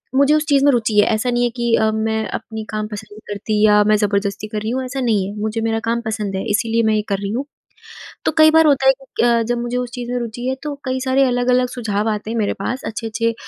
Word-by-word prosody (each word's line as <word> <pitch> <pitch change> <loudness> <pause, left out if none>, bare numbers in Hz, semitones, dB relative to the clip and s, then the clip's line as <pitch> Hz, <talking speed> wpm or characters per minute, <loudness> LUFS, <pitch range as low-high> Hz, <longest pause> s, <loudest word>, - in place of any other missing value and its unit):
मुझे 280 +2 +4
उस 305 0 +1
चीज़ 275 -1 +4
में 285 - +6
रुचि 225 -4 0
है - - +6
ऐसा 220 +3 -1
नहीं 240 0 +1
है 240 - +2
कि 235 -1 0
अ, 220 0 +2
मैं 220 0 -1
अपनी 220 -1 -8
काम 215 0 -3
पसंद 210 0 -8
नहीं 215 - -12
करती 210 +1 -2
या 210 -1 +5
मैं 215 +1 +3
ज़बरदस्ती 200 0 -1
कर 215 0 -4
रही 220 - -3
हूँ, 260 +1 -1
ऐसा 255 +2 -5
नहीं 215 -6 +1
है। 200 - -7
मुझे 220 +1 -2
मेरा 225 0 0
काम 235 +1 0
पसंद 215 -3 -3
है 190 - -3
इसीलिए 225 +2 +1
मैं 220 -1 +2
ये 210 - +1
कर 195 - +1
रही 200 0 -4
हूँ। 260 +5 -2 0.8
तो - - +1
कई 315 0 +8
बार 320 0 +5
होता 275 -2 +3
है 265 - +8
कि 265 - -4
अ, 235 -1 +3
जब 240 +1 -1
मुझे 240 +1 -3
उस 250 -1 -2
चीज़ 245 -1 -5
में 250 - 0
रूचि 240 +1 -5
है 260 - 0
तो 295 -1 -4
कई 260 0 -2
सारे 265 +1 +3
अलग-अलग 250 0 +2
सुझाव 220 -4 -2
आते 215 +1 -4
हैं 230 - -3
मेरे 210 -2 0
पास। 255 +5 -3
अच्छे-अच्छे 230 +1 -2
225 Hz, 270 wpm, -19 LUFS, 215-250 Hz, 0.8 s, कई